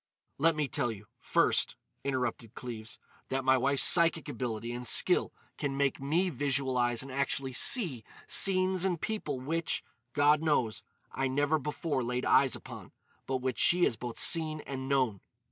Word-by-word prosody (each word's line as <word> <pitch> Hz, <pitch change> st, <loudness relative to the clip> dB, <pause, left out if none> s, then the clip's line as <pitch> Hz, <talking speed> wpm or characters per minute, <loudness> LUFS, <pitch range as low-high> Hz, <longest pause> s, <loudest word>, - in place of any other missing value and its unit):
"Let 165 Hz, +2 st, +3 dB
me 150 Hz, -2 st, -1 dB
tell 130 Hz, -4 st, -1 dB
you, 105 Hz, -1 st, -10 dB
first," -, -, +1 dB, 0.3 s
interrupted 125 Hz, -4 st, -3 dB
Cleves, 115 Hz, -3 st, -7 dB, 0.3 s
"that 135 Hz, 0 st, -2 dB
my 130 Hz, 0 st, +5 dB
wife's 135 Hz, +2 st, +1 dB
psychic 165 Hz, -2 st, +5 dB
ability 120 Hz, -5 st, -4 dB
and 120 Hz, 0 st, -5 dB
skill -, -, +4 dB, 0.3 s
can 140 Hz, -2 st, -3 dB
make 140 Hz, -1 st, 0 dB
me 170 Hz, +7 st, 0 dB
visualise 130 Hz, -4 st, 0 dB
and 135 Hz, -, -10 dB
actually 135 Hz, 0 st, -2 dB
see 150 Hz, -, +2 dB, 0.2 s
scenes 185 Hz, -1 st, +3 dB
and 180 Hz, -4 st, 0 dB
people 155 Hz, -12 st, -4 dB
which, 160 Hz, +5 st, -2 dB, 0.3 s
God 145 Hz, +1 st, +3 dB
knows, 140 Hz, -9 st, 0 dB, 0.3 s
I 135 Hz, 0 st, -2 dB
never 145 Hz, +4 st, 0 dB
before 150 Hz, 0 st, -3 dB
laid 125 Hz, +1 st, -3 dB
eyes 135 Hz, -3 st, +3 dB
upon, -, -, -11 dB, 0.3 s
but 130 Hz, -1 st, -3 dB
which 130 Hz, -4 st, -2 dB
she 175 Hz, 0 st, +4 dB
has 115 Hz, -, +2 dB
both 120 Hz, +1 st, -7 dB
seen 155 Hz, -2 st, +3 dB
and 135 Hz, -1 st, -7 dB
known. 130 Hz, -8 st, 0 dB
135 Hz, 160 wpm, -30 LUFS, 125-155 Hz, 0.3 s, my